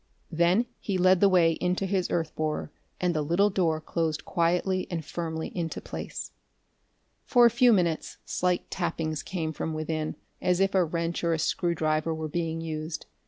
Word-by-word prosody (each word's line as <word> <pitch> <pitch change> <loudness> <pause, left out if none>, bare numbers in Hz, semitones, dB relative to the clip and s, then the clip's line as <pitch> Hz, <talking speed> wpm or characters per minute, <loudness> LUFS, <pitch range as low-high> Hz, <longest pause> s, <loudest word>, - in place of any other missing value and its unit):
Then 175 +7 +3
he 195 -3 -2
led 185 0 +5
the 200 - +6
way 175 -3 +5
into 180 +2 0
his 190 -1 0
earth 165 -2 -1
borer, 155 -1 -2 0.3
and 180 -1 +1
the 155 - 0
little 175 +7 +2
door 165 -5 +1
closed 155 -2 -2
quietly 180 +2 +1
and 165 -3 -3
firmly 160 0 -4
into 165 -3 -3
place. - - -6 0.9
For 245 -2 +5
a 235 - +6
few 250 0 +5
minutes 175 -6 +1
slight 180 -1 -1
tappings 160 -3 -2
came 160 -4 -3
from 160 +1 -3
within, 155 0 -2 0.3
as 180 0 +2
if 195 0 +2
a 190 -2 +4
wrench 170 +1 -2
or 170 -1 +2
a - - +1
screwdriver 155 0 0
were 160 0 -3
being 165 +1 -2
used. 155 0 -4
170 Hz, 170 wpm, -27 LUFS, 160-180 Hz, 0.9 s, the